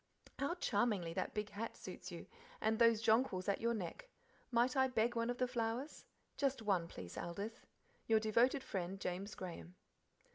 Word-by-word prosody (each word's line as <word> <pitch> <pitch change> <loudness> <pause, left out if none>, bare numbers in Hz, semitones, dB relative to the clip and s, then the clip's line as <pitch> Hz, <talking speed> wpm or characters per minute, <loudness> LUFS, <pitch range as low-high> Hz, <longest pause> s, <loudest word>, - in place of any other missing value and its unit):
How 280 +6 0
charmingly 205 - +1
that - - -2
big 210 -1 -2
hat 220 +3 -4
suits - - -7
you, - - -7 0.3
and 220 0 +1
those 230 -2 +5
jonquils 220 -5 +3
at 200 - +1
your 235 +1 +2
neck. 225 - -5 0.4
Might 245 +2 +3
I 265 0 +5
beg 240 -1 +1
one 230 0 +1
of 245 - -1
the 255 - +2
flowers? 240 +3 -2 0.3
just 275 -4 +1
one, 190 -5 +2
please, 90 - -7
Aldith. 200 +7 -5 0.4
Your 220 -1 +5
devoted 235 +5 +3
friend, 190 0 -3
James 195 +3 -3
Graham." 180 -1 -7
225 Hz, 170 wpm, -38 LUFS, 195-245 Hz, 0.4 s, those